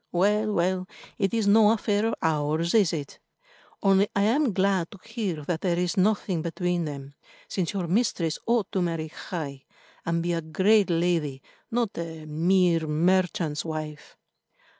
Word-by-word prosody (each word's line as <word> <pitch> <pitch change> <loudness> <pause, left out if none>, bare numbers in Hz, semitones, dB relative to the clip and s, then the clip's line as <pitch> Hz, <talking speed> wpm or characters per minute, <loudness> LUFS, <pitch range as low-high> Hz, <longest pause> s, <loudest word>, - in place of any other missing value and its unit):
Well, 210 +4 +2
well, 185 0 0 0.3
it 195 -2 +1
is 225 -2 0
no 210 +1 +6
affair 215 -1 +1
of - - -1
ours, 155 +1 0
is 205 -7 +4
it? 145 -4 -5 0.6
Only 195 0 +4
I 200 - +3
am 250 +5 +2
glad 190 -3 +1
to 205 - -13
hear 205 -9 -3
that 165 -1 -2
there 175 -3 0
is 180 -1 0
nothing 195 -3 +1
between 175 +1 -1
them, 140 -2 -7 0.3
since 185 0 -2
your 190 -3 -2
mistress 175 -4 0
ought 230 -4 +1
to 190 - 0
marry 165 -2 -2
high, 145 -5 -6 0.4
and 170 0 -1
be 175 0 0
a 165 - -1
great 190 +6 +3
lady, 165 -5 0 0.3
not 235 -3 -1
a 160 -2 -6
mere 165 +1 +2
merchant's 170 -1 +1
wife." 155 -2 -6
175 Hz, 160 wpm, -26 LUFS, 160-200 Hz, 0.6 s, no